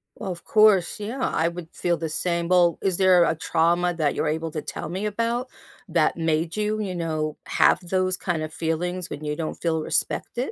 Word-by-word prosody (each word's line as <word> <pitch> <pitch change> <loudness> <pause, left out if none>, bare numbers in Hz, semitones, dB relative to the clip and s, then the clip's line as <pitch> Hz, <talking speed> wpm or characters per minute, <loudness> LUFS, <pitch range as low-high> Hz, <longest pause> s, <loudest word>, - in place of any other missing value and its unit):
Well, 195 -4 -5
of 170 - -8
course, 215 -3 +4
yeah, 230 +6 -5
I 165 -7 +1
would 170 -1 -6
feel 175 -1 0
the 165 -2 -4
same. 170 +1 -1
Well, 175 -2 +4
is 190 -3 +1
there 185 -2 +5
a 165 - +1
trauma 170 +2 +1
that 150 -3 +1
you're 155 - -1
able 160 +1 -2
to 155 - -4
tell 150 - -6
me 190 +4 -3
about 230 +4 -1 0.4
that 165 -1 +1
made 160 +1 0
you, 215 0 0
you 185 -3 -3
know, 155 -2 -2
have - - +4
those 185 0 0
kind 165 -4 -2
of 155 0 -6
feelings 175 +2 -2
when 155 - -7
you 150 0 -2
don't 160 -1 -4
feel 160 -2 -1
respected? 245 - -1
175 Hz, 205 wpm, -24 LUFS, 160-185 Hz, 0.4 s, there